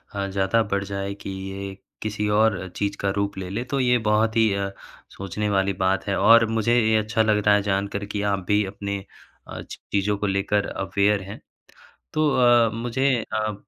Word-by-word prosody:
अ, 100 -1 -2
ज़्यादा 95 +3 +1
बढ़ 100 0 0
जाए 100 0 -4
कि - - -5
ये 95 0 -6 0.3
किसी 105 0 -2
और 105 -3 +2
चीज़ 100 0 -2
का 100 - -1
रूप 100 -1 -1
ले 95 -1 -5
ले, 105 +6 -3
तो 135 +2 -2
ये 125 -1 +3
बहुत 110 +1 +2
ही 110 -2 +4
अ, 100 0 -2 0.4
सोचने 100 +2 -4
वाली 100 -1 +1
बात 95 +1 +1
है 100 - 0
और 115 0 +6
मुझे 115 +1 +1
ये 110 -1 +2
अच्छा 110 +1 0
लग 110 -1 +3
रहा 105 -1 +6
है 105 - +2
जानकर 100 0 -2
कि 105 0 -4
आप 95 -2 -2
भी 105 0 +3
अपने 100 +1 -4 0.5
अ, - - -7
चीज़ों 100 +1 -2
को 105 - -2
लेकर 100 +1 0
अवेयर 100 +1 0
हैं। 100 +2 -9 0.7
तो 155 -1 +2
अ, 120 -2 +5
मुझे 120 +4 0 0.2
अ, 110 -1 -1
105 Hz, 195 wpm, -24 LUFS, 100-110 Hz, 0.7 s, और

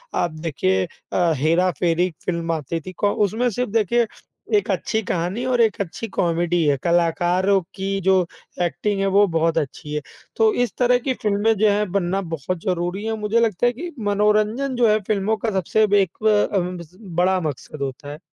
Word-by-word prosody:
आप 175 - 0
देखिए 95 - 0 0.3
अ, 175 -2 +2
हेरा-फेरी 170 +3 +2
एक 180 -3 -6
फ़िल्म 170 -2 -1
आती 160 0 -2
थी 185 - -8
कौ 205 0 +1
उसमें 235 +5 0
सिर्फ़ 245 0 -3
देखिए 230 +2 +2 0.5
एक 410 - -2
अच्छी 220 - -1
कहानी 185 +5 -2
और 250 -2 +2
एक 225 -1 +2
अच्छी 200 +4 -5
कॉमेडी 175 -3 0
है, 145 -1 +3
कलाकारों 175 +3 +2 0.2
की 195 0 -2
जो 190 +1 +4 0.5
एक्टिंग 200 +4 -1
है 195 - +1
वो 205 +1 +7
बहुत 165 0 +2
अच्छी 150 0 -3
है। 150 - -1 0.3
तो 220 -1 +3
इस 235 - -3
तरह 250 0 +4
की 260 +1 -1
फ़िल्में 210 0 +2
जो 215 +1 +4
है 205 +1 +2
बनना 195 0 0
बहुत 165 +4 -4
ज़रूरी 180 +2 -1
है 225 - -1
और 220 - -2
मुझे 210 +2 +1
लगता 225 -2 +1
है 245 - +3
कि 340 +8 -6 0.2
मनोरंजन 215 +6 +1
जो 240 -1 +3
है 215 0 +3
फ़िल्मों 215 +1 +1
का 225 - +1
सबसे 215 +4 +2
बे 205 0 +4
एक 185 -3 -3
ब 210 -1 +3
उम, 180 0 -2 0.4
बड़ा 185 +2 +3
मक़सद 150 -1 -5
होता 140 +1 -5
है। 150 - -9
190 Hz, 195 wpm, -22 LUFS, 170-215 Hz, 0.5 s, वो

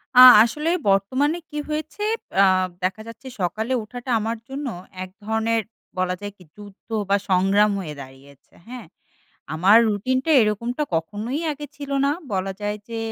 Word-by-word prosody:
আ - - +7 0.2
আসলে 300 +7 -2 0.2
বর্তমানে 260 - +1
কি 300 - -7
হয়েছে, 305 +5 -5 0.4
আ - - +7 0.4
দেখা 190 +4 -1
যাচ্ছে 230 +4 -11
সকালে 215 +8 -2
ওঠাটা 245 +4 -9
আমার 225 +2 -3
জন্য 275 +1 -5 0.4
এক 185 - -9 0.2
ধরনের 225 +1 0 0.4
বলা 185 0 0
যায় 205 0 -5
কি 180 - -16
যুদ্ধ 205 0 -14 0.2
বা, 200 - +4
সংগ্রাম 195 +3 +3
হয়ে 155 -5 -6
দাঁড়িয়েছে। 135 +1 -15 0.2
হ্যাঁ? 245 -3 -9 0.7
আমার 190 +7 +5
রুটিনটা 255 +8 -1
এরকমটা 235 +6 -1
কখনোই 210 - -3
আগে 295 0 -8
ছিল 285 -1 -8 0.2
না। - - +2 0.2
বলা 195 0 -1
যায় 205 0 -2
যে, 230 -1 -5
215 Hz, 150 wpm, -22 LUFS, 195-260 Hz, 0.7 s, আ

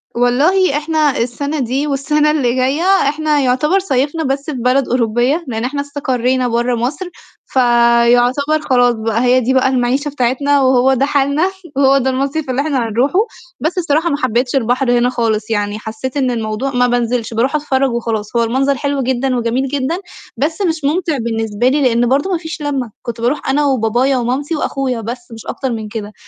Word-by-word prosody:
والله 285 +8 +2
إحنا 305 -2 0
السَنة 280 +6 -2
دي، 265 +3 -1
والسَنة 295 +2 +1
اللي 255 -5 0
جاية 265 +5 0 0.3
إحنا 300 0 0
يعتبر 285 +8 +2
صيّفنا 290 -1 -1
بس 275 0 -2
في - - -4
بلد 250 +2 +1
أوروبية، 245 +6 +1
لإن 225 -1 -3
إحنا 285 +3 -2
استقرينا 260 -3 -1
برّا 240 +1 0
مصر، 270 +10 -3 0.4
فيعتبر 245 +4 +3
خلاص 245 -3 +3
بقى 225 +1 -1
هي 250 +1 +4
دي 255 +1 0
بقى 260 0 +3
المَعيشة 260 +3 0
بتاعتنا 280 +1 +1
وهو 260 0 +3
ده 265 +1 +1
حالنا 285 +5 +1 0.3
وهو 275 0 +4
ده 265 -1 +1
المصيف 275 +3 -2
اللي 255 +2 0
إحنا 275 -6 -1
هنروحه، 255 - +1 0.4
بس 330 +4 -2
الصراحة 325 0 +1
ما 285 - 0
حبيتش 250 -1 0
البحر 250 0 +1
هنا 240 +1 +2
خالص، 225 -3 -1
يعني 205 -1 -1
حسّيت 220 +5 -6
إن 260 -3 +1
الموضوع 225 +3 -3
ما 250 -1 +2
بانزلش، 240 -1 -1
باروح 250 +6 0
أتفرّج 275 -3 0
وخلاص، 225 -2 -3
هو 235 - +3
المنظر 265 +4 +1
حلو 285 -1 -1
جدًا 260 +1 0
وجميل 245 +3 -1
جدًا، 285 +4 -2 0.4
بس 320 - -1
مش 330 -5 -1
مُمتع 315 +1 0
بالنسبة 225 -1 -1
لي 285 +3 +2
لإن 245 -2 +2
برضه 285 +8 +1
ما 350 - +1
فيش 320 -1 -7
لمّة، 275 -6 -2
كنت 230 -1 -6
باروح 255 +5 -1
أنا 290 +2 +2
وبابايا 255 0 +1
ومامتي 260 +6 -1
وأخويا 265 -5 -2
بس 240 +2 -7
مش 225 -1 -10
أكتر 265 -2 -3
من 220 -2 -4
كده، 210 -1 -6
260 Hz, 180 wpm, -16 LUFS, 240-285 Hz, 0.4 s, هي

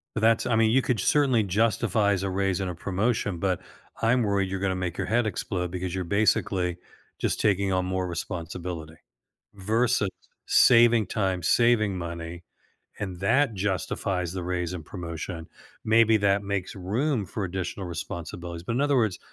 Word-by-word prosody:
But - - -1
that's 115 +2 +3
I 115 -3 +2
mean, 110 -1 +4
you 130 +3 +4
could 120 -5 0
certainly 130 -2 +3
justifies 105 -1 +1
a 95 - -1
raise 95 0 0
and 95 - -2
a 90 - -5
promotion, 100 +1 -1
but 95 -1 0 0.4
I'm 120 +2 +3
worried 100 -3 0
you're 95 0 -3
gonna 95 -1 0
make 90 -1 -3
your - - -1
head 120 +1 +1
explode 90 -3 -3
because 90 0 -4
you're 95 -1 -2
basically 90 -2 +1 0.4
just - - -1
taking 100 -2 +2
on 95 0 +1
more 95 0 -1
responsibility 85 -1 -5 0.6
versus 110 +1 +1 0.4
saving 115 -3 +6
time, 95 -3 -1
saving 110 0 +3
money, 85 0 -6 0.5
and 95 -4 -5
that 115 +5 +2
justifies 95 -2 -2
the 95 -1 -4
raise 90 0 -2
and 85 -4 -6
promotion. 85 -1 -6 0.4
Maybe 110 0 +5
that 100 0 +2
makes 100 -2 -3
room 105 +5 -1
for 100 +3 -4
additional 95 +1 -4
responsibilities. 85 0 -6
In 120 +4 0
other 145 -1 +2
words, 110 -7 +1
95 Hz, 160 wpm, -26 LUFS, 90-110 Hz, 0.6 s, saving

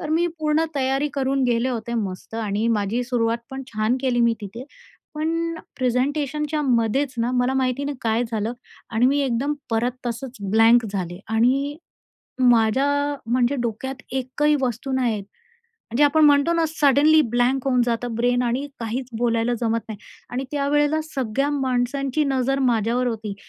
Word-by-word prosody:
तर 305 - -5
मी 335 +2 +2
पूर्ण 310 +1 +1
तयारी 270 +1 +1
करून 270 0 0
गेले 240 +1 +1
होते 235 -1 -3
मस्त 200 -1 -4
आणि 215 0 -1
माझी 220 +2 0
सुरुवात 235 -2 0
पण 270 0 -5
छान 220 0 0
केली 250 -2 +1
मी 235 -1 +4
तिथे, 220 +5 -8 0.5
पण 330 +2 -1 0.2
प्रेझेंटेशनच्यामध्येच 275 -1 0
ना 235 +2 +1
मला 250 +1 +1
माहिती 260 +1 0
नाही 285 -1 -3
काय 225 +1 +1
झालं 220 +2 -1 0.4
आणि 230 +2 +3
मी 285 +2 +2
एकदम 265 +4 0 0.2
परत 235 +2 +1
तसंच 240 +2 -5
ब्लँक 225 +2 +5
झाले. 180 -2 -4
आणि, 265 +6 +1 0.7
माझ्या 280 +6 +2 0.2
म्हणजे 250 +2 +2
डोक्यात 240 +3 -4
एकही 265 +3 +1
वस्तू 255 +1 -2
नाहीये, 240 -5 0 0.5
म्हणजे 290 - -1
आपण 305 +2 +4
म्हणतो 290 +3 +5
ना 330 -1 +2
सडनली 305 +1 +4
ब्लँक 250 +2 +2
होऊन 250 -1 +3
जातं 235 0 -2
ब्रेन 245 +1 +2
आणि 245 +4 -1
काहीच 240 +3 -3
बोलायला 235 0 +1
जमत 230 -1 +1
नाही. 215 -2 -6 0.3
आणि 255 +2 -3
त्यावेळेला 295 +2 +1
सगळ्या 265 +2 0
माणसांची 270 +1 0
नजर 270 0 0
माझ्यावर 240 0 +1
होती 220 -3 -3
250 Hz, 150 wpm, -23 LUFS, 230-280 Hz, 0.7 s, ब्लँक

